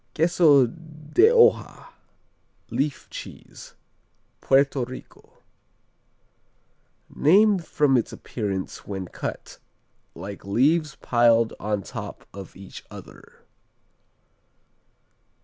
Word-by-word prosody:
Queso 160 -4 +4
de 155 - 0
Hoja, 470 -1 +3 0.8
Leaf 145 0 -2
Cheese - - -11 0.7
Puerto 135 -1 +2
Rico 130 +1 -12 1.6
Named 195 +4 +3
from 145 -4 +1
its 120 - 0
appearance 100 -5 -5
when 95 -2 -5
cut, - - -7 0.6
like 100 +3 -8
leaves 145 +9 +1
piled 115 -2 +3
on 105 -1 -2
top - - -8
of 100 -2 -10
each 95 -1 -11
other. - - -14
135 Hz, 80 wpm, -24 LUFS, 105-155 Hz, 1.6 s, Queso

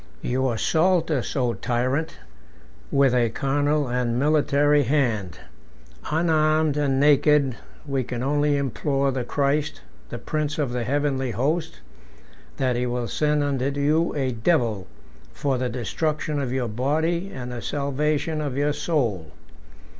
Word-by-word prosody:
"You 130 +1 0
assault 165 +9 +1
us, 135 -6 -2
O 125 -4 +1
tyrant! 130 +8 -1 0.7
with 140 -2 +3
a 120 -2 +2
carnal 145 +4 0
and 120 -1 -1
military 145 0 +3
hand: 115 - 0 0.7
unarmed 155 -1 +2
and 140 -2 +1
naked 145 -2 +4 0.3
we 135 -2 -1
can 125 0 -4
only 145 +1 +1
implore 140 +1 0
the 130 -1 -2
Christ, 140 +3 -1 0.3
the - - -5
prince 155 -1 -3
of 145 -5 -1
the 120 -1 -2
heavenly 135 -1 0
host, 145 - -2 0.8
that 130 -2 +1
he 125 +1 -1
will 120 -1 -2
send 150 +2 +1
unto 140 -2 0
you 155 +4 +2
a 135 -3 0
devil, 115 - 0 0.5
for 135 -3 -1
the 125 -1 -1
destruction 150 +5 -2
of 130 -3 -3
your 130 -2 -1
body 160 - -1
and 125 -1 -6
the 120 -1 -5
salvation 150 +3 -1
of 140 -3 -3
your 145 +1 +1
soul. 115 - -1
140 Hz, 140 wpm, -24 LUFS, 125-150 Hz, 0.8 s, naked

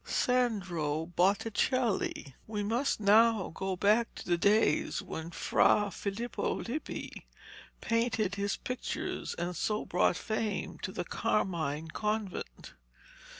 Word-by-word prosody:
SANDRO 180 -11 0
BOTTICELLI 205 - +1
We 210 -1 -2
must 235 +6 0
now 215 0 +5
go 190 +2 -2
back 215 +5 +2
to - - -8
the 175 - +2
days 200 -2 +2
when 160 +1 -6
Fra 200 +6 +3
Filippo 210 +6 -2
Lippi 275 +7 -5 0.5
painted 230 -3 +1
his 200 0 -1
pictures 250 0 -4
and 175 +1 -3
so 210 +5 -1
brought 180 0 +2
fame 220 -2 -3
to - - -4
the - - -3
Carmine 160 -6 -1
Convent. 210 - -3
205 Hz, 110 wpm, -31 LUFS, 175-225 Hz, 0.5 s, now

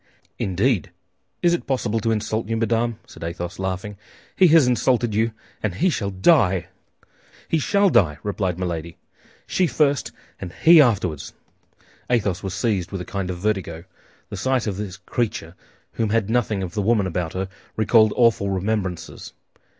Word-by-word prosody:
"Indeed! 95 - 0 0.5
Is 175 -1 +4
it 175 - -2
possible 120 -5 0
to 115 - -1
insult 110 0 -1
you, 115 - 0
madame?" 115 0 0
said - - -12
Athos, 85 +1 -5
laughing; 95 +2 -4 0.4
"he 185 - +6
has 160 -3 +6
insulted 125 -2 +1
you, 110 +2 +1 0.3
and 100 -4 -2
he 180 +3 +2
shall 100 -9 -2
die!" 95 - +3 0.8
"He 165 - +1
shall 200 +4 +2
die!" 75 -6 +3
replied 95 -4 -2
Milady; 85 -2 -4 0.5
"she 185 - +1
first, 140 -1 +1 0.3
and 90 -2 -7
he 165 -1 +9
afterward." 95 - +1 0.9
Athos 105 -7 +1
was 95 -2 -4
seized 100 -8 -1
with 95 -2 -4
a - - -6
kind 100 -4 -4
of 90 - -3
vertigo. 95 -4 -2 0.5
The - - -5
sight 130 -2 0
of 100 -4 -3
this 100 -2 -5
creature, 95 -3 -3 0.4
who 115 - -1
had 110 0 0
nothing 110 -5 0
of 85 -2 -6
the 105 - -1
woman 105 -1 +2
about 90 -2 -3
her, 95 +1 -3 0.3
recalled 110 0 +4
awful 115 -5 +3
remembrances. 95 -2 -3
105 Hz, 160 wpm, -22 LUFS, 95-120 Hz, 0.9 s, he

